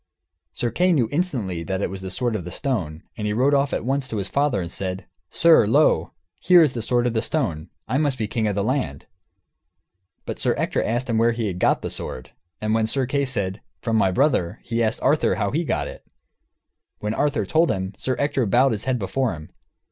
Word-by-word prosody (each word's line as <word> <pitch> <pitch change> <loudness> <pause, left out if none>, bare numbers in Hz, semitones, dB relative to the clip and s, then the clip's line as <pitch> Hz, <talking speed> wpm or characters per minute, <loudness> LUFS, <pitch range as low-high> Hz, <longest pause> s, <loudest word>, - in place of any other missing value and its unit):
Sir 120 - -1
Kay 180 +8 +3
knew 125 -8 +2
instantly 125 - -1
that 95 +2 -3
it - - -2
was 95 -1 -6
the 95 - -5
sword 120 +3 -1
of 100 - -3
the 90 - -7
stone, 90 - -3
and 105 -2 -3
he 105 - 0
rode 130 +6 +2
off 140 0 +2
at - - -2
once 135 +1 0
to 110 - -4
his 100 -1 -1
father 140 -6 +1
and 85 -2 -4
said, 95 0 -4 0.2
"Sir, 165 -10 +5
lo, 115 - +3 0.3
here 175 - +6
is 145 -5 +1
the 115 - -3
sword 120 +2 +1
of 120 - 0
the 110 - +1
stone; 90 - -2 0.2
I 130 +5 0
must 145 -4 +1
be 110 - -1
king 110 +1 -1
of 105 - -1
the 100 - 0
land." 110 - -2 1.2
But - - -5
Sir - - +2
Ector - - 0
asked 120 +3 -1
him 115 -2 +1
where 115 +1 +3
he 110 -5 -2
got 90 - +1
the - - -3
sword. 65 0 -7 0.3
And 110 0 -1
when 110 -1 +2
Sir 130 +3 0
Kay 140 +2 0
said, 100 -6 -1 0.2
"From 115 -2 0
my 105 -3 +3
brother," 110 - +1
he 115 0 -1
asked 110 -1 0
Arthur 150 +2 +3
how 100 -3 -1
he 160 +6 0
got - - -1
it. - - -10 0.9
When 105 +1 -3
Arthur 130 -6 0
told 160 - +2
him, 95 +1 -2
Sir 130 - -2
Ector 140 -4 0
bowed 130 +6 +4
his 110 -1 -3
head 130 -1 +1
before 115 0 -1
him. 75 0 -12
115 Hz, 225 wpm, -23 LUFS, 100-135 Hz, 1.2 s, here